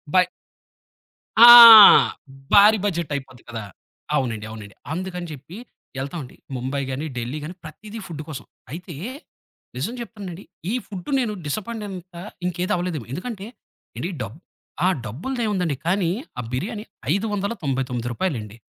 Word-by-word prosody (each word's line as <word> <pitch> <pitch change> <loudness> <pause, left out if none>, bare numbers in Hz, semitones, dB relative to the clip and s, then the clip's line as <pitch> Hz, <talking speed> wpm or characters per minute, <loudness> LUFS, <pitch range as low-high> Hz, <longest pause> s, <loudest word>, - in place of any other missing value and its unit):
By 185 - +7 1.2
ఆ! - - +12 1.1
భారీ 210 +2 +7
budget 170 -6 -2
అయిపోద్ది 130 -3 -8
కదా! 115 -2 -6 0.5
అవునండి. 115 -7 -2
అవునండి. 105 -3 -10 0.2
అందుకని 180 0 -5
చెప్పి 155 +6 -10 0.4
ఎళ్తామండి. 140 -1 -7 0.2
ముంబై 130 +3 -3
గాని, 135 +4 -4
ఢిల్లీ 125 +5 -4
గాని 170 +4 -7
ప్రతీదీ 205 +8 -10
ఫుడ్డు 155 -4 -7
కోసం. 140 -4 -7 0.3
అయితే 170 +3 -8 0.8
నిజం 145 - -3
చెప్తున్నానండి, 200 -6 -8 0.3
ఈ - - -1
ఫుడ్డు 190 0 -8
నేను 235 -4 -1
డిసప్పాయింటైనంత 190 0 -6 0.3
ఇంకేదవ్వలేదేమో. 175 -5 -2
ఎందుకంటే, 200 - -6 0.5
ఏండి 180 - -3
డబ్ 115 +9 -9 0.5
ఆ! - - +5 0.2
డబ్బుల్దేముందండి. 185 - -2
కానీ 180 -2 +1 0.3
ఆ - - -1
బిర్యానీ 210 - -4 0.3
599 165 - -2
రూపాయలండి. 115 - -4
170 Hz, 115 wpm, -22 LUFS, 135-200 Hz, 1.2 s, ఆ